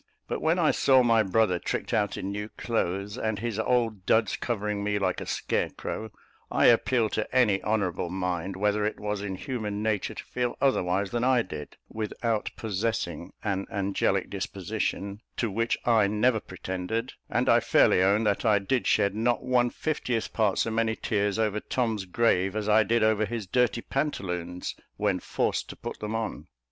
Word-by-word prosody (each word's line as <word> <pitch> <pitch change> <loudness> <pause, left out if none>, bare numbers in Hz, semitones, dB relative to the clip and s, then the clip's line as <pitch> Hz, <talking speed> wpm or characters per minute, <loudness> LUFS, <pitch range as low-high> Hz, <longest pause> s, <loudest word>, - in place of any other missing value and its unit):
But - - -3
when 160 +3 +2
I 165 -4 +4
saw 130 -2 +4
my 115 -2 +4
brother 100 -2 +2
tricked - - -3
out 105 -2 +1
in 95 - -3
new 105 +1 -4
clothes, 100 -1 -2
and 110 -1 -1
his 110 0 -3
old 110 -5 0
duds 110 -3 +3
covering 105 -3 -2
me, 105 0 0
like 95 -2 -1
a - - -6
scarecrow, 110 0 -2 0.4
I - - +2
appeal 120 0 +4
to 110 +4 -3
any 105 -7 +4
honourable 95 -5 -1
mind 90 0 -2
whether 105 +2 +1
it 105 - -2
was 105 -1 -2
in 100 -2 -3
human 105 -3 -4
nature 110 -3 -1
to - - -6
feel 125 -1 -2
otherwise 100 -7 +1
than 120 0 -1
I 125 -2 +4
did, 75 -6 -8
without 110 0 -2
possessing 100 -6 -3
an 100 -2 -1
angelic 100 -1 0
disposition, 100 +1 -3 0.2
to 115 -4 0
which 115 +4 0
I 110 -4 +4
never 110 +3 +2
pretended; 95 +5 -4 0.2
and - - 0
I - - +6
fairly - - +4
own 100 +4 +3
that 100 -1 +1
I 105 -2 +4
did 115 +6 0
shed 100 -2 +3
not 120 +3 0
one 125 -1 +2
fiftieth 125 -6 -2
part 105 -4 +2
so 115 - +1
many 110 0 +1
tears 100 -2 0
over 105 -2 +1
Tom's 110 -4 -1
grave, 95 -1 +1
as 105 -1 -2
I 110 +1 +6
did 115 +2 +2
over 110 -1 +3
his 115 -1 -4
dirty 120 +2 +1
pantaloons, 90 - -3 0.2
when 100 -3 +1
forced - - -1
to - - -7
put - - -7
them 105 +1 -3
on. 110 -1 -4
105 Hz, 175 wpm, -27 LUFS, 100-115 Hz, 0.4 s, I